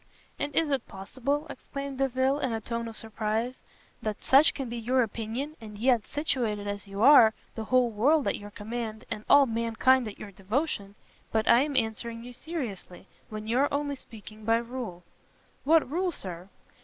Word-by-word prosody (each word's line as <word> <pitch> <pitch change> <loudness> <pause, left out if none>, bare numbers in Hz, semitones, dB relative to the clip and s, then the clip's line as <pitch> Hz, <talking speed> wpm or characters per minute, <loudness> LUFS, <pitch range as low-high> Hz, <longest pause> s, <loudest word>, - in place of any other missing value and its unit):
"And 290 -1 -3
is 320 -3 +2
it 270 -4 -1
possible," 260 +9 -3
exclaimed 275 -1 -7
Delvile, 265 +1 +1
in 260 -5 -1
a 225 - -1
tone 230 +1 -4
of 225 - -8
surprise, 220 +3 -2 0.4
"that 215 -2 -4
such 275 +4 +6
can 270 -3 -4
be 235 +1 -5
your 250 +3 +2
opinion, 230 +7 -4
and 210 -2 -9
yet, 240 0 +2
situated 235 -9 -1
as 205 0 -4
you 200 +2 -3
are, 235 -6 +8 0.2
the 220 - -5
whole 250 0 +3
world 275 +8 +3
at - - +1
your 205 0 -9
command, 220 +1 -5
and 215 -1 -4
all 285 -1 +8
mankind 230 +2 +2
at 210 - -8
your 205 - -9
devotion 200 - -2 0.4
but 220 -1 +1
I 235 - +7
am 285 -1 0
answering 230 0 -2
you 245 +1 -9
seriously, 240 - -6 0.2
when 215 0 -6
you 235 +3 +1
are 285 - +2
only 285 0 -1
speaking 220 -4 -12
by 225 +1 +3
rule." 235 -7 -6 0.6
"What 320 +2 +5
rule, 355 +6 0
Sir?" 180 - -6
235 Hz, 180 wpm, -28 LUFS, 215-270 Hz, 0.6 s, are